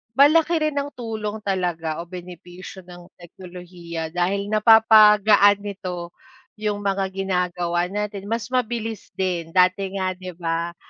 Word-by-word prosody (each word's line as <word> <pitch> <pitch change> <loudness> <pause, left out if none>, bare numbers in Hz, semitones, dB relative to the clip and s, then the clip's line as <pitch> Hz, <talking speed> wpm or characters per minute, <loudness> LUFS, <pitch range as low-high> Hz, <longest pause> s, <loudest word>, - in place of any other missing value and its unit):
Malaki 320 +4 +4
rin 305 -1 -1
ang 285 0 -2
tulong 220 -3 -5
talaga 170 -5 -2
o - - -15
benepisyo 180 +1 -11
ng 175 -1 -13
teknolohiya 175 -2 -9
dahil 195 +4 -1
napapagaan 215 -2 +6
nito 185 -4 -6 0.5
yung 210 -1 -3
mga 195 -1 0
ginagawa 180 -2 -1
natin 205 0 -5
mas 230 +1 -4
mabilis 225 -4 -3
din. 180 -3 -2
Dati 185 +1 +2
nga 185 -1 -1
'di 185 -1 -9
ba 170 0 -3
190 Hz, 125 wpm, -22 LUFS, 175-210 Hz, 0.5 s, napapagaan